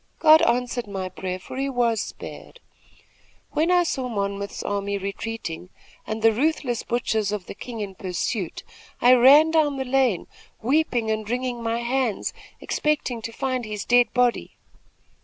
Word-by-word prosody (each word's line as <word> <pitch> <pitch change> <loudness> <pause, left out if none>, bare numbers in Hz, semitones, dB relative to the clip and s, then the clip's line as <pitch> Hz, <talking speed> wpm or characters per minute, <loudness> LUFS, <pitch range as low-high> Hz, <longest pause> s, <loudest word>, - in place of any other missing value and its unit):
God 315 0 +7
answered 245 -1 0
my 190 -2 -4
prayer, 185 0 -4
for 185 +7 -9
he 275 +1 -1
was 235 -5 +1
spared. - - -9 0.9
When 320 +3 +1
I 360 -1 +5
saw 260 -6 -2
Monmouth's 200 -2 -3
army 200 0 -2
retreating 195 -3 -5 0.4
and 220 0 -4
the 225 - +7
ruthless 255 -1 0
butchers 220 -3 -1
of 210 -4 -4
the - - -7
king 225 +2 -7
in 200 -2 -5
pursuit, 185 +1 -3 0.4
I 245 +1 +6
ran 280 +6 +7
down 300 -3 +2
the 265 - -2
lane, 250 -7 +1 0.3
weeping 245 -3 +1
and 215 -1 -3
wringing 245 0 -2
my 230 +1 -1
hands, 245 -3 -1 0.3
expecting 290 -6 -1
to 230 - -5
find 255 +1 -2
his 210 -2 -5
dead 245 0 +4
body. 245 -1 0
235 Hz, 155 wpm, -24 LUFS, 205-260 Hz, 0.9 s, God